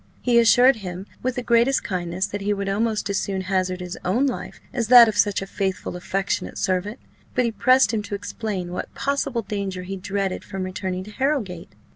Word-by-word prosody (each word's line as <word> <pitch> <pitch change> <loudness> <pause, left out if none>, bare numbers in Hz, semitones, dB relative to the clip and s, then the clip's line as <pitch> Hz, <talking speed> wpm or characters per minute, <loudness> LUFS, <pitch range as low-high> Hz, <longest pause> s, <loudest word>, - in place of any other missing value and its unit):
He 240 -1 +3
assured 245 +2 +6
him, 185 -2 -6 0.2
with 255 0 -1
the 250 - -3
greatest 240 +3 +3
kindness, 180 0 -2
that 205 - -5
he 205 +1 0
would 200 0 -3
almost 215 +2 0
as 195 - +1
soon 195 -1 -2
hazard 185 -1 -1
his 180 0 -6
own 230 +10 +2
life 260 - -4
as 235 -2 -1
that 240 -1 +10
of 215 - -1
such 205 -2 +2
a - - -5
faithful, 190 -2 -3
affectionate 195 +2 -2
servant; 190 +4 -1 0.4
but 250 - +3
he 230 - 0
pressed 255 -1 +4
him 220 - 0
to 205 0 -5
explain 200 -3 -4
what 180 - -5
possible 275 -4 -1
danger 195 -3 -4
he 195 +1 -5
dreaded 195 0 -2
from 195 -2 -5
returning 185 0 -4
to 210 - -11
Harrowgate. 210 - -2
200 Hz, 200 wpm, -23 LUFS, 185-235 Hz, 0.4 s, that